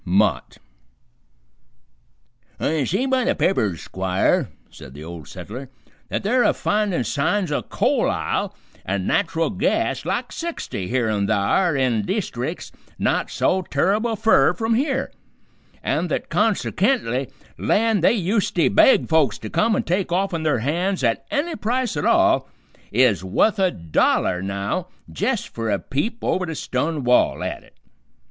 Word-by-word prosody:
MOTT - - +1 2.0
"I 155 -3 0
see 195 - 0
by 260 -1 +1
the 275 +4 +1
papers, 100 - 0
Squire," 95 0 0 0.2
said 65 - -12
the 75 - -9
Old 80 -3 -9
Settler, 125 +5 -8 0.4
"that - - -2
they're 245 +5 +2
a - - +3
finding 210 -3 0
signs 175 +4 0
o' 145 - 0
coal - - 0
ile - - -2 0.3
an' 95 0 -2
nat'ral 165 - 0
gas 210 +4 0
like - - -2
sixty 330 - -5
here 120 0 0
an' 105 -2 0
thar 110 - +2
in 125 -5 +1
deestric's 100 - -3 0.3
not - - 0
so 190 - +1
terrible 205 +9 0
fur 220 +2 +4
from 225 0 -1
here, 270 +2 0 0.7
an' - - 0
th't - - -2
konsekently 205 - +1 0.3
land 220 -4 +2
they 225 +5 +4
usety 185 -2 +1
beg 265 - +5
folks 155 -9 +2
to 110 - -8
come 220 0 +2
an' - - 0
take 180 +1 -1
offen 180 -2 0
their 155 -6 +1
hands 175 +3 0
at 115 -2 0
any 320 +4 -1
price 245 +2 -1
at 145 - -2
all - - +3 0.4
is 110 -5 +3
wuth 200 - +2
a 190 -1 +4
dollar 90 - +1
now, 100 - -3 0.2
jist 80 - -1
for 115 -1 -4
a 100 - +2
peep 145 - -3
over 185 -1 0
the 160 - -4
stun 145 +3 -2
wall 125 0 +3
at - - -4
it. - - -23
165 Hz, 150 wpm, -22 LUFS, -, 2.0 s, beg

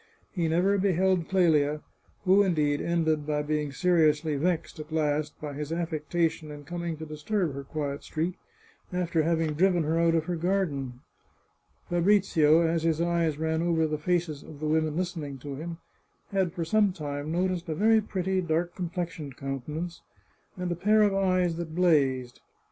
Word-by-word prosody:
He 170 -4 -1
never 185 +5 +2
be 195 0 +2
held 185 -1 +1
Clelia, 155 -5 +3 0.4
who, 190 +2 +6
indeed, 150 -7 +1
ended 160 -3 0
by 150 -1 0
being 150 -1 -1
seriously 155 -1 +2
vexed, 160 +2 -1
at 155 +1 -8
last, 150 -1 -1
by 150 -2 -5
his 150 +2 -5
affectation 165 -1 -1
in 145 -1 -9
coming 170 +1 -4
to 160 - -7
disturb 155 +2 -2
her 140 0 -6
quiet 140 0 -4
street, 165 +3 -2 0.6
after 175 -2 0
having 160 -1 +1
driven 175 +1 +3
her 160 +2 0
out 165 0 +3
of 160 -1 +1
her 175 - -2
garden. 160 -8 -1 0.9
Fabrizio, 175 -4 +4
as 165 0 +1
his 165 -1 +1
eyes 170 -3 +1
ran 160 +1 0
over 165 -2 +2
the 155 -1 -2
faces 165 -3 -1
of 150 - -12
the 155 - -4
women 155 0 +1
listening 165 -6 -3
to 140 +2 -7
him, 165 +4 -6 0.5
had 190 -3 +1
for 170 -1 -3
some 205 +3 +3
time 145 -3 -5
noticed 180 0 -1
a 155 - -1
very 220 +5 +4
pretty 190 -2 -1
dark 170 0 -1
complexioned 170 -6 -5
countenance, 150 +6 -5 0.6
and 180 -1 -3
a - - 0
pair 210 +5 +4
of 205 -1 +3
eyes 185 -3 +1
that 165 -2 -5
blazed. 135 -8 +2
165 Hz, 170 wpm, -28 LUFS, 150-180 Hz, 0.9 s, who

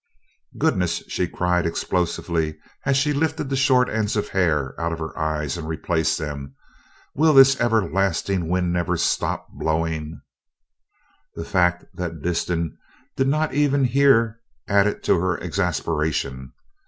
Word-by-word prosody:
"Goodness!" 90 -2 0
she 90 - -1
cried 90 0 0
explosively, 85 -2 -1 0.3
as 135 -1 +3
she 150 +2 +2
lifted 145 -1 -1
the 135 - 0
short 130 -2 +3
ends 110 -1 -1
of 105 - -1
hair 75 -8 +1
out 85 0 -1
of 85 - -3
her 80 -1 -6
eyes 80 -2 -2
and 80 - -6
replaced 80 0 0
them. 70 -3 -6 0.6
"Will 155 +1 +3
this 135 -1 +7
everlasting 95 -5 +1
wind 90 -1 0
never 90 0 0
stop - - -1
blowing!" 80 -1 -2 1.2
The 85 - -5
fact 90 -2 +1
that 85 -3 -5
Disston 85 -2 -2 0.4
did 135 - +1
not 155 +2 +1
even 140 -1 +2
hear 120 -3 +3 0.3
added 100 +1 +2
to - - +3
her 90 0 0
exasperation. 80 -7 -2
90 Hz, 135 wpm, -23 LUFS, 80-115 Hz, 1.2 s, this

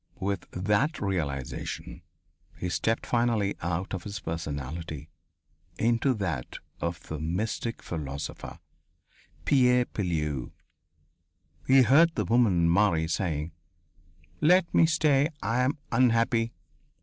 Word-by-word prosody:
With 100 0 -2
that 105 - 0
realization, 70 -9 -4 0.6
he 90 - -3
stepped 115 +5 0
finally 115 -4 +1
out 90 +3 -2
of 95 - -3
his 105 +2 -6
personality 80 0 -5 0.7
into 120 +3 +2
that 80 - -3 0.2
of 85 -1 -3
the 80 - -5
mystic 100 +8 -3
philosopher, 70 -3 -6 0.9
Pierre 125 -2 +4
Pilleux. 75 - -3 1.1
He 130 0 +7
heard 160 +8 +5
the 105 - 0
woman 95 -6 +3
Marie 85 -2 +3
saying: 80 -2 -2 0.9
"Let 180 +3 +4
me 165 - +5
stay. 150 -2 +3
I 115 +4 0
am 130 +4 +1
unhappy." 115 -1 +2
100 Hz, 105 wpm, -28 LUFS, 80-120 Hz, 1.1 s, He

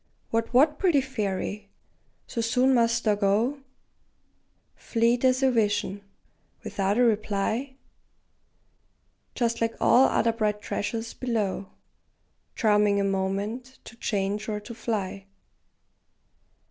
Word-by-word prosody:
What, 230 0 0
what, 295 +4 +4
pretty 350 -7 +3
fairy! 210 -6 -3 0.6
so 235 - -3
soon 250 +3 +2
must 235 -1 +2
thou 215 - +3
go, 210 +7 +1 1.2
Fleet 235 +1 +1
as 255 +1 +3
a 265 - +4
vision, 205 -3 0 0.6
without 195 +1 -1
a 250 - +4
reply, 220 +4 0 1.6
Just 235 -1 -1
like 230 0 0
all 260 +2 +5
other 230 +1 +2
bright 210 -2 -1
treasures 225 +2 -4
below, 210 -6 -2 0.9
Charming 210 -2 +3
a - - +1
moment, 200 +6 -2
to 225 - -12
change 205 -1 -2
or 210 -1 -2
to 210 +3 -9
fly? 200 -4 -4
225 Hz, 110 wpm, -26 LUFS, 205-245 Hz, 1.6 s, all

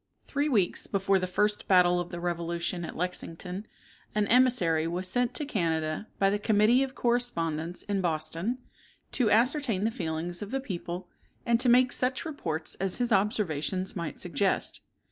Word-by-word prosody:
Three 290 +1 0
weeks 200 -10 +1
before 195 0 +2
the 185 - -2
first 210 +3 0
battle 180 -2 +5
of 175 0 -4
the 175 - -6
revolution 170 0 -2
at - - -6
Lexington, 180 +2 -4 0.5
an 210 -1 +2
emissary 210 -11 +3
was 180 +2 -3
sent 245 +4 +1
to 300 - -1
Canada 165 - -1
by 195 0 +3
the 205 - 0
Committee 215 +4 +4
of 270 -1 -2
Correspondence 175 -9 0
in 200 -1 -1
Boston, 165 +7 -1 0.5
to 245 -5 +2
ascertain 235 -2 +2
the 225 - +1
feelings 170 -2 -3
of 205 - -5
the 270 - -1
people, 180 -6 -5 0.4
and 235 -2 +3
to 250 0 +3
make 250 +1 +5
such 255 +3 0
reports 165 - -3
as 190 -1 0
his 245 -1 0
observations 190 -3 0
might 170 -3 -4
suggest. 180 +3 -1
190 Hz, 165 wpm, -28 LUFS, 170-235 Hz, 0.5 s, battle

